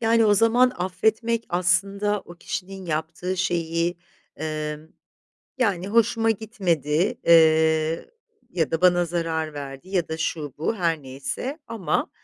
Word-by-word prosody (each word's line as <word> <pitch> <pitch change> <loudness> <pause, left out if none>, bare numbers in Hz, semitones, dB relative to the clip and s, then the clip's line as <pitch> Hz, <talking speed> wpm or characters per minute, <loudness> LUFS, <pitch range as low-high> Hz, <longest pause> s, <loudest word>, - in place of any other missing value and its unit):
yani, 230 0 +4
o 205 - +5
zaman 235 +4 +4
affetmek 220 +6 0
aslında 195 +3 +1
o 175 - -13
kişinin 190 +2 -6
yaptığı 165 +3 -3
şeyi, 170 -1 0 0.4
emm, 155 0 -4 0.7
yani, 195 -7 0
hoşuma 225 +1 +3
gitmedi. 185 - 0
Eee, 160 -1 +4 0.4
ya 165 -4 0
da 165 - -1
bana 175 -1 +4
zarar 165 -2 -2
verdi 140 +2 -8
ya 185 -4 0
da 160 - -3
şu 155 -3 -3
bu 160 - 0
her 165 -5 0
neyse 140 - -5
ama, 220 -6 -1
175 Hz, 130 wpm, -24 LUFS, 160-205 Hz, 0.7 s, o